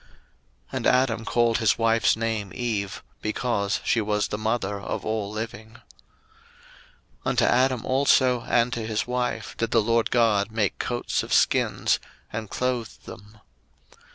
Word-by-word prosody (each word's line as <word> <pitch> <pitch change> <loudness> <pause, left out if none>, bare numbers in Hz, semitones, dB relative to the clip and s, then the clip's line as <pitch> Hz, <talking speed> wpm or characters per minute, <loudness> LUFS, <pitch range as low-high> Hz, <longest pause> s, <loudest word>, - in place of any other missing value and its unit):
01:003:020 - - -28 0.7
And - - 0
Adam 125 -3 +2
called 120 -1 +2
his 110 -2 +3
wife's 115 -2 +3
name 110 -3 -2
Eve; 105 -5 -3 0.2
because 110 -2 -1
she 115 - +2
was 105 0 0
the 105 - -3
mother 110 -2 -1
of - - -4
all 110 -2 -2
living. 110 0 -6
01:003:021 - - -22 1.4
Unto - - +2
Adam 130 -1 +2
also 130 -2 +3
and 120 +1 +2
to 115 - -3
his 110 -1 -1
wife 125 0 -3
did 115 - -1
the 115 - +3
LORD 115 +1 +1
God 110 -4 +2
make 110 -3 -1
coats 120 0 -1
of - - -8
skins, - - +2 0.3
and 110 -1 -4
clothed 125 -3 -3
them. 105 +1 -12
115 Hz, 150 wpm, -25 LUFS, 105-120 Hz, 1.4 s, his